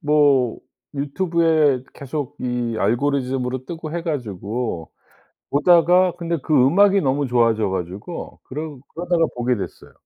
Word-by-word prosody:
뭐 145 -5 +3 0.4
유튜브에 155 -2 +2
계속 145 +1 -5
이 120 -2 -2
알고리즘으로 130 +2 0
뜨고 160 -1 -6
해 170 0 -3
가지고 110 - -4 0.6
보다가 175 +4 +4
근데 170 -1 -2
그 155 - -1
음악이 190 +9 +5
너무 140 0 +1
좋아져 115 -4 +2
가지고 95 - -6
그러 150 +1 -6 0.2
그러다가 175 -1 +1
보게 125 +1 0
됐어요. 100 - -7
140 Hz, 285 characters per minute, -21 LUFS, 125-165 Hz, 0.6 s, 음악이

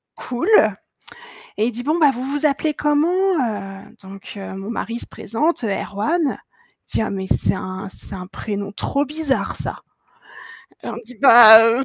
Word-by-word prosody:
«Cool» 255 - -4 1.1
et 215 - +1
il 245 - -2
dit: 240 +2 -6
«Bon, 310 +5 0
bah 295 -4 +5
vous 250 +1 -6
vous 290 +3 0
appelez 300 +2 0
comment? 345 +7 +1
Heu», 205 -7 -3 0.2
donc 195 0 -11
heu, 195 -1 -7
mon 195 +3 -7
mari 230 0 -4
se - - -5
présente, 250 +5 -2
heu, - - -1
Erwan, 275 - -1 0.5
il - - -20
dit: - - +1
«Ah 220 - -3
mais 190 -1 -4
c'est - - +1
un 185 +1 -6
c'est - - -11
un 185 -1 -7
prénom 200 0 -6
trop 280 +7 -1
bizarre 295 -1 -2
ça». - - -5 1.0
On - - -6
dit: 250 +2 -13
«Bah, 225 -3 +10
heu, 230 +3 +2
235 Hz, 175 wpm, -20 LUFS, 200-295 Hz, 1.1 s, Bah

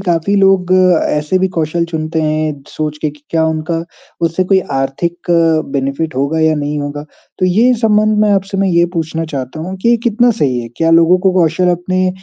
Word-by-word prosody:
काफ़ी 175 +1 0
लोग 190 -2 +3 0.3
ऐसे 150 +5 0
भी 190 0 +1
कौशल 165 +1 0
चुनते 160 -1 -3
हैं 155 -2 -2
सोच 150 -1 -4
के 155 - 0
कि 145 0 -19
क्या 160 -1 +1
उनका 160 +1 -2 0.5
उससे 175 +3 -1
कोई 190 +1 +3 0.2
आर्थिक 170 +7 -3 0.4
बेनिफ़िट 140 +3 -2
होगा 140 +4 0
या 160 0 +3
नहीं 150 0 -3
होगा? 145 0 -5 0.3
तो 185 - +2
ये 225 +8 +3
संबंध 215 -1 +2
में 210 - +2
आपसे 195 0 -1
मैं 195 0 +1
ये 170 -1 +3
पूछना 165 0 -2
चाहता 135 +3 -5
हूँ 185 +4 -5
कि 235 0 +4
कितना 240 +1 +3
सही 125 -4 +1
है? 115 - -7
क्या 165 0 +1
लोगों 165 +2 +5
को 190 0 +1
कौशल 170 +2 +1
अपने 185 +1 -1
165 Hz, 190 wpm, -14 LUFS, 155-185 Hz, 0.5 s, लोगों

